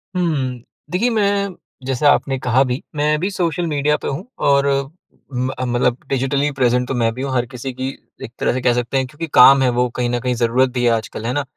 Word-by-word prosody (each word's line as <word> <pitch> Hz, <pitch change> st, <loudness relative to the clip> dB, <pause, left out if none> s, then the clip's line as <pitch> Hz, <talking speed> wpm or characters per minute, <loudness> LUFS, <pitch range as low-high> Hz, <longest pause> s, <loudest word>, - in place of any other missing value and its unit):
हुँ, 140 Hz, -8 st, -1 dB, 0.3 s
देखिए, 220 Hz, +7 st, +1 dB
मैं, 200 Hz, -3 st, +1 dB, 0.4 s
जैसा 135 Hz, +2 st, +2 dB
आपने 135 Hz, -1 st, 0 dB
कहा 125 Hz, +2 st, +2 dB
भी, 125 Hz, +2 st, -3 dB
मैं 150 Hz, +1 st, +1 dB
भी 190 Hz, +4 st, -1 dB
सोशल 175 Hz, -2 st, -1 dB
मीडिया 150 Hz, 0 st, +1 dB
पर -, -, -2 dB
हूँ, 140 Hz, +7 st, -4 dB
और 140 Hz, 0 st, +3 dB, 0.9 s
अम 125 Hz, -1 st, -2 dB
मतलब 120 Hz, 0 st, +1 dB
डिजिटली 135 Hz, +2 st, 0 dB
प्रेज़ेंट 125 Hz, -2 st, +1 dB
तो -, -, -2 dB
मैं 115 Hz, -1 st, +1 dB
भी 130 Hz, -, -7 dB
हूँ। 135 Hz, -1 st, -3 dB
हर 125 Hz, -1 st, +1 dB
किसी 130 Hz, +1 st, -6 dB
की 130 Hz, +1 st, -3 dB, 0.3 s
एक 115 Hz, -, -7 dB
तरह -, -, +1 dB
से 130 Hz, -, -2 dB
कह 120 Hz, -1 st, +3 dB
सकते 120 Hz, +2 st, -1 dB
हैं, 130 Hz, -, +1 dB
क्योंकि 160 Hz, +5 st, -6 dB
काम 135 Hz, +2 st, +8 dB
है, 130 Hz, -, +3 dB
वो 125 Hz, +1 st, +1 dB
कहीं 120 Hz, -1 st, -1 dB
न 120 Hz, 0 st, -1 dB
कहीं 125 Hz, +1 st, -1 dB
ज़रूरत 120 Hz, +2 st, +2 dB
भी 125 Hz, -1 st, -1 dB
है 120 Hz, -, +4 dB
आजकल, 110 Hz, 0 st, -3 dB
है 125 Hz, -, -1 dB
ना। 145 Hz, 0 st, 0 dB
130 Hz, 230 wpm, -19 LUFS, 125-145 Hz, 0.9 s, काम